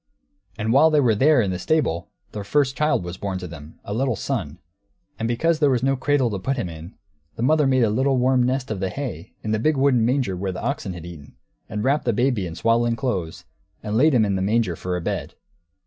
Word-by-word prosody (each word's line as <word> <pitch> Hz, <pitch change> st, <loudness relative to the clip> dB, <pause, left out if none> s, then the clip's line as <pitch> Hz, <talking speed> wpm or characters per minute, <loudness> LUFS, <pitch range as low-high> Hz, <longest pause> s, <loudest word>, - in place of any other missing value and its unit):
And 110 Hz, +2 st, 0 dB
while 155 Hz, +4 st, +6 dB
they 155 Hz, -1 st, +3 dB
were 125 Hz, -5 st, +3 dB
there, 135 Hz, +5 st, +4 dB
in 95 Hz, -, -1 dB
the 90 Hz, -, -3 dB
stable, 95 Hz, -, 0 dB, 0.2 s
their 105 Hz, -, -5 dB
first 135 Hz, +4 st, +1 dB
child 150 Hz, -8 st, +1 dB
was 85 Hz, +1 st, -6 dB
born 100 Hz, -2 st, -3 dB
to 90 Hz, -, -6 dB
them, 80 Hz, -1 st, -12 dB
a 100 Hz, -, -4 dB
little 130 Hz, +1 st, 0 dB
son. -, -, -3 dB, 0.6 s
And 115 Hz, -, -1 dB
because 155 Hz, +8 st, +1 dB
there 145 Hz, -3 st, +4 dB
was 125 Hz, -2 st, +1 dB
no 135 Hz, 0 st, +2 dB
cradle 135 Hz, -2 st, +1 dB
to 100 Hz, -, -3 dB
put 135 Hz, +8 st, -2 dB
Him 110 Hz, -8 st, -2 dB
in, 80 Hz, +3 st, -10 dB, 0.4 s
the 115 Hz, -, -3 dB
mother 150 Hz, +2 st, +3 dB
made 130 Hz, -2 st, +3 dB
a 110 Hz, -, +3 dB
little 130 Hz, +4 st, +1 dB
warm 130 Hz, 0 st, +3 dB
nest 125 Hz, 0 st, -1 dB
of 105 Hz, -, -3 dB
the 95 Hz, 0 st, -1 dB
hay 120 Hz, -, -6 dB
in 110 Hz, -, -2 dB
the 110 Hz, -, +1 dB
big 155 Hz, +5 st, +1 dB
wooden 135 Hz, -4 st, +3 dB
manger 125 Hz, -5 st, +1 dB
where 95 Hz, +1 st, -3 dB
the 90 Hz, -, -6 dB
oxen 125 Hz, -9 st, -2 dB
had 85 Hz, -2 st, -9 dB
eaten, 80 Hz, -7 st, -11 dB, 0.3 s
and 105 Hz, 0 st, -3 dB
wrapped 140 Hz, +3 st, +1 dB
the 120 Hz, -, +2 dB
baby 120 Hz, -4 st, +1 dB
in 80 Hz, -, -7 dB
swaddling 115 Hz, +3 st, +2 dB
clothes, 100 Hz, -10 st, -3 dB, 0.4 s
and 105 Hz, 0 st, -3 dB
laid 145 Hz, +4 st, +4 dB
Him 110 Hz, -3 st, +4 dB
in 100 Hz, -, 0 dB
the 95 Hz, -, -1 dB
manger, 105 Hz, -2 st, +1 dB
for 90 Hz, +2 st, -3 dB
a -, -, -4 dB
bed! -, -, -4 dB
115 Hz, 240 wpm, -23 LUFS, 95-135 Hz, 0.6 s, while